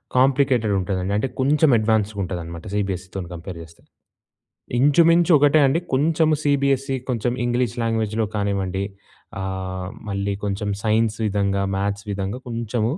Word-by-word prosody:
Complicated 130 -4 +3
ఉంటదండి. 95 +1 -2
అంటే 105 +5 0
కొంచెం 145 +3 +3
అడ్వాన్స్‌గా 110 -1 0
ఉంటుందనమాట, 85 -2 -6
సీబీఎస్‌సీతోని 95 -2 -3
కంపేర్ 85 +1 -7
జేస్తే. 80 0 -14 1.0
ఇంచుమించు 165 +6 +5
ఒకటే 145 +2 +4
అండి 145 +5 +2
కొంచెం 155 +3 +3
సీబీఎస్‌సీ 140 -1 +1
కొంచెం 120 -1 0
ఇంగ్లీష్ 120 0 0
లాంగ్వేజ్‌లో 110 -1 0
కానివ్వండి 100 -2 -1 0.6
ఆహ్, 95 -1 -4 0.2
మళ్ళీ 100 0 -1
కొంచెం 100 +1 -2
సైన్స్ 110 0 +2
విధంగా, 100 -1 0
మ్యాథ్స్ 100 +1 -2
విధంగా 100 +4 -3
కొంచెం 115 -1 -2
105 Hz, 120 wpm, -22 LUFS, 95-130 Hz, 1.0 s, ఇంచుమించు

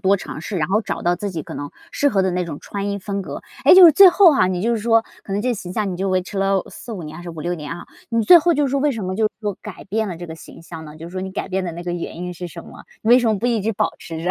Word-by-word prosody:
多 200 0 +3
尝 155 - -8
试， 190 +4 -5
然 155 +1 -1
后 210 +3 +2
找 - - -5
到 175 +1 +1
自 200 +2 -4
己 160 -3 -4
可 - - -9
能 145 0 -5 0.2
适 285 - +1
合 195 -6 +1
的 190 - +1
那 180 0 -1
种 155 -4 -6
穿 200 0 -5
衣 200 - -2
风 200 0 -4
格。 - - -7 0.2
哎， - - +8
就 370 -1 +10
是 335 - +10
最 380 +5 +8
后 360 -1 +6
哈， 185 -9 +3
你 185 0 -2
就 235 - +1
是 230 - 0
说 225 0 +3 0.2
可 195 - -6
能 205 +2 -1
这 250 - +1
形 185 -5 -6
象 210 -2 -1
你 - - -5
就 195 +1 -2
维 185 -1 +1
持 195 +2 -6
了 195 -1 +1
4-5 220 -7 -8
年 155 0 -8
还 175 - -10
是 - - -7
5-6 170 +1 -4
年 155 0 -6
哈， - - -9 0.3
你 230 -1 +1
最 345 +11 +8
后 340 +1 +2
就 295 - +1
是 270 - -1
说， 280 - +1
为 290 0 +1
什 220 -5 -5
么 185 +1 -3
就 220 - +1
是 - - -3
说 205 -3 -3
改 - - -9
变 220 +3 -1
了 175 - -5
这 175 - -8
个 160 - -7
形 165 - -13
象 165 -1 -9
呢， 150 0 -11
就 165 +1 -9
是 - - -13
说 185 0 -5
你 190 0 -6
改 - - -4
变 190 0 -2
的 170 - -4
那 170 +1 -7
个 175 0 -4
原 170 -1 -5
因 180 0 -5
是 175 +1 -7
什 170 0 -10
么？ - - -13 0.2
你 220 - +1
为 250 - +8
什 245 - 0
么 215 - +2
不 235 +5 -2
一 230 -3 +1
直 220 +3 -1
保 - - 0
持 165 -1 -7
着？ 180 - 0
190 Hz, 375 characters per minute, -20 LUFS, 175-225 Hz, 0.3 s, 就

